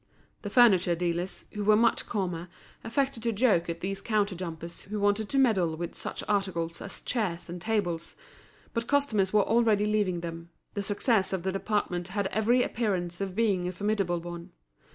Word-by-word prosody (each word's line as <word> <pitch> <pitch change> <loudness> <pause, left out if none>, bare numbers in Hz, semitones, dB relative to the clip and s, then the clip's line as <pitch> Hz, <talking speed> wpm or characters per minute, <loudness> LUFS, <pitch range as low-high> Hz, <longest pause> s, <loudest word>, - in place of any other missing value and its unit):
The 205 - -5
furniture 195 -7 +5
dealers, 175 +2 -2
who 210 - -3
were 210 +1 +5
much 230 +2 +2
calmer, 180 -5 -2 0.3
affected 265 +1 -1
to 230 +1 0
joke 205 -6 +2
at 170 0 -4
these 195 +1 -3
counter 210 -3 +1
jumpers 170 -1 -6
who 210 +1 -5
wanted 205 +1 +1
to 275 - 0
meddle 190 -12 +3
with 170 +1 -4
such - - -5
articles 185 -5 -1
as - - -5
chairs 195 -8 -2
and 175 0 -6
tables; 180 -6 -1 0.6
but 230 0 -2
customers 230 -10 +2
were 210 -1 +4
already 225 -3 +3
leaving 205 -5 +1
them, 165 0 -6 0.2
the 205 - -2
success 205 0 +1
of 185 -3 -2
the 190 - 0
department 195 -3 -1
had 200 +1 -2
every 235 +4 +3
appearance 185 -7 -2
of 190 -2 -3
being 200 -5 +1
a - - -1
formidable 195 -2 0
one. 170 0 -8
195 Hz, 175 wpm, -28 LUFS, 175-215 Hz, 0.6 s, furniture